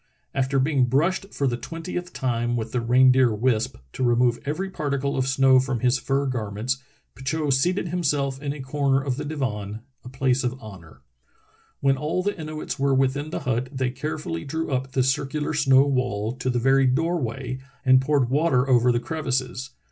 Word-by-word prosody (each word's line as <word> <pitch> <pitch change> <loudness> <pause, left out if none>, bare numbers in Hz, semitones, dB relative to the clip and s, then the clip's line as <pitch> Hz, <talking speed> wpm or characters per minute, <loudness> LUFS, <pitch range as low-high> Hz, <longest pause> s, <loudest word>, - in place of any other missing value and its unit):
After 135 +1 0
being 135 -1 +3
brushed 170 +10 0
for 140 - -2
the 120 -2 0
twentieth 175 +5 -6
time 120 -4 -1
with 110 -1 -4
the 125 - -1
reindeer 125 0 +4
wisp, 120 +1 0 0.2
to - - -3
remove 120 0 +3
every 165 +7 -2
particle 140 -6 -2
of 130 -1 0
snow 130 -1 +5
from 130 -3 -2
his 125 +1 +2
fur 135 +2 0
garments, 120 +1 -2 0.3
Petitot 140 +2 -1
seated 175 +6 +1
himself 140 -6 -1
in 145 -1 -2
a 145 -1 -6
corner 135 0 +1
of 135 -2 -2
the 150 - -4
divan, 110 -8 -3 0.2
a 125 - -9
place 130 0 0
of 125 0 -1
honor. 85 - -12 0.8
When 135 -1 +3
all 155 +6 -1
the 205 +1 -1
Inuits 155 -3 -5
were 135 0 +2
within 135 +3 +1
the - - -4
hut 125 0 -1
they 130 -2 -1
carefully 130 - -4
drew 160 +2 -3
up 130 0 -2
the 130 - +2
circular 140 +4 -1
snow 135 -2 +5
wall 125 -6 -1
to 130 +1 -3
the 125 - 0
very 135 +2 +4
door 165 +6 +1
way 130 +2 -4 0.3
and 130 0 +6
poured 140 -2 +2
water 140 -3 +2
over 125 -1 +4
the 120 - +1
crevices. 130 -3 -3
130 Hz, 185 wpm, -24 LUFS, 125-145 Hz, 0.8 s, and